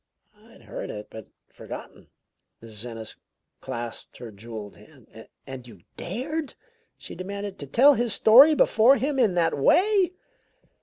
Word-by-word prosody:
"I'd - - -20
heard - - -7
it, 105 0 -8
but 110 -2 -10 0.3
forgotten." - - -10 0.6
Mrs. 110 +1 -7
Ennis 115 -2 -8 0.4
clasped 120 -3 -7
her 120 -2 -9
jeweled 105 0 -9
hand. - - -17 0.2
"And 130 -2 -9
you 105 -7 -15
dared," 275 - -5 0.4
she - - -11
demanded, 200 +2 -7
"to 140 - -7
tell 270 - +5
his 240 -2 -1
story 265 +10 +7
before 250 +1 +4
him 275 0 -2
in 215 -8 +2
that 170 -2 +1
way?" 370 - +3
185 Hz, 140 wpm, -25 LUFS, -, 0.6 s, story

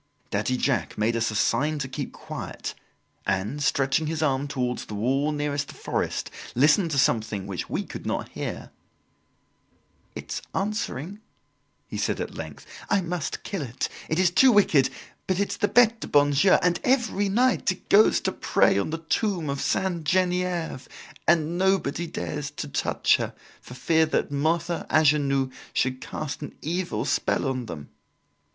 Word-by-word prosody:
Daddy 130 - 0
Jacques 120 -10 0
made 110 +2 +1
us 115 0 +1
a 110 - -5
sign 150 +7 +1
to 135 -2 -3
keep 130 - -5
quiet - - -6 0.5
and, 95 +9 -1
stretching 140 +2 +1
his 160 0 -1
arm 140 -1 +1
towards 125 -3 -2
the 105 - -7
wall 135 +8 +1
nearest 145 -1 -2
the - - -11
forest, - - -2 0.2
listened 150 - +4
to 145 - -1
something 110 -6 +1
which 95 -2 -5
we - - -1
could - - -8
not - - -2
hear. - - -6 1.4
"It's - - -5
answering," 200 - -3 0.7
he - - -6
said - - 0
at - - -4
length. - - -8 0.2
"I 200 - +3
must 175 -2 -3
kill 195 -5 -4
it. 125 -3 -3 0.2
It 160 - 0
is 180 -1 +4
too 260 +8 +6
wicked, 170 - +4 0.4
but 185 0 0
it's 200 - -1
the 205 - +2
Bete 230 -1 +4
du - - -6
bon 145 0 +4
Dieu, 165 +7 +4
and, 180 -1 +2
every 240 -6 +2
night, 245 0 +2
it 185 - -9
goes 210 +2 +6
to - - 0
pray 100 - +2
on 100 - -1
the 165 - -2
tomb 165 -2 -1
of 140 - -3
Sainte 180 -4 0
Genevieve 180 -4 0 0.4
and 170 +1 +2
nobody 185 -4 +1
dares 90 - -4
to - - -6
touch - - +2
her, - - -4 0.3
for 125 - -11
fear 160 +3 +2
that 155 - 0
Mother 165 +4 0
Angenoux 140 -3 +3 0.2
should 130 0 0
cast 145 -3 -5
an 145 - -7
evil 160 -9 -2
spell 140 - 0
on 130 -3 -2
them." 75 -7 -8
150 Hz, 165 wpm, -26 LUFS, 130-180 Hz, 1.4 s, too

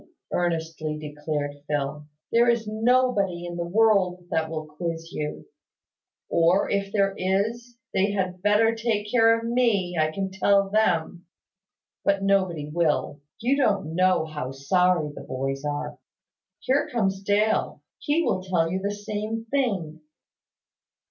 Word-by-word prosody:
earnestly 160 -3 -1
declared 150 -1 -4 0.2
Phil. 145 0 -2 0.2
"There 235 +1 +4
is 235 -1 +1
nobody 215 -5 +1
in 175 0 -5
the 170 0 -3
world 190 -3 +2
that 160 -1 0
will 155 -1 -4
quiz 165 +2 -5
you; 150 0 -5 0.8
or, 170 +4 +3
if 200 -1 -1
there 200 -2 +2
is, 225 +6 -1 0.2
they 195 +2 +2
had 185 -3 -2
better 210 +3 +4
take 220 -2 -2
care 230 -2 +5
of 230 - -6
me, 230 -7 +1
I 155 0 +3
can 190 +4 -3
tell 195 +1 +2
them. 180 -5 +1 0.8
But 200 0 +1
nobody 185 -6 +1
will. 150 -2 0 0.2
You 260 +5 +2
don't 195 - +1
know 185 -1 +3
how 150 -4 -5
sorry 165 +3 +2
the - - -9
boys 135 +1 -4
are. 145 0 -4 0.6
Here 265 +3 +1
comes 195 -5 0
Dale. 205 +2 +1 0.2
He 310 +3 +1
will 185 - 0
tell 175 -3 0
you 190 - -1
the 200 +1 -2
same 215 +2 -4
thing." 190 - -1
190 Hz, 140 wpm, -25 LUFS, 160-215 Hz, 0.8 s, care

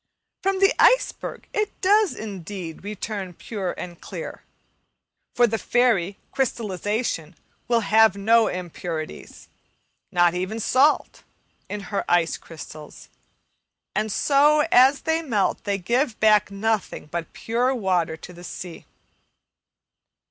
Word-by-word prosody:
From 390 0 +1
the 390 0 +5
iceberg - - +2
it 425 0 -2
does 410 0 +3
indeed 190 -5 -7
return 200 -2 -5
pure 195 -3 -4
and 175 -2 -8
clear; - - -7 0.9
for 245 - +5
the 225 -1 -1
fairy 220 -7 +2
Crystallization 210 - -2 0.3
will 235 -1 +3
have 220 -1 +4
no 225 +3 +4
impurities, 175 -2 -6 0.6
not 175 -2 +4
even 185 +5 -3
salt, 265 +7 +2 0.5
in 205 0 -4
her 200 - 0
ice 175 -1 +3
crystals, 155 -2 -11 0.8
and 215 0 -1
so 295 +6 +4
as 265 +3 +6
they 320 0 0
melt 220 - -1
they 200 -1 0
give 235 +6 0
back 215 -2 +4
nothing 215 +1 -2
but 165 +1 -5
pure 245 +4 0
water 180 -7 0
to 180 +3 -11
the 175 0 -12
sea. 175 -1 -8
210 Hz, 120 wpm, -24 LUFS, 180-245 Hz, 0.9 s, as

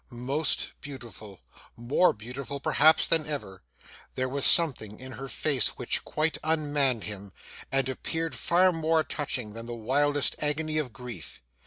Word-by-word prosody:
Most 135 +5 -1
beautiful 110 - -10 0.4
more 125 +10 +3
beautiful, 125 +5 -7
perhaps, 155 +3 +4
than 160 -2 +1
ever 95 -11 -5 0.5
there 130 0 -1
was 135 +1 +1
something 120 -11 +5
in 130 0 -9
her 135 +2 -7
face 135 -2 0
which - - -2
quite 155 +1 -1
unmanned 145 -7 +1
him, 100 0 -8 0.4
and 135 -1 +1
appeared 160 +5 -3
far 185 +2 +3
more 160 -1 +1
touching 125 -9 -4
than 115 +1 -8
the 120 - -5
wildest 145 +5 +1
agony 155 +1 -1
of 140 -5 -3
grief. 125 0 -9
135 Hz, 145 wpm, -28 LUFS, 120-155 Hz, 0.5 s, something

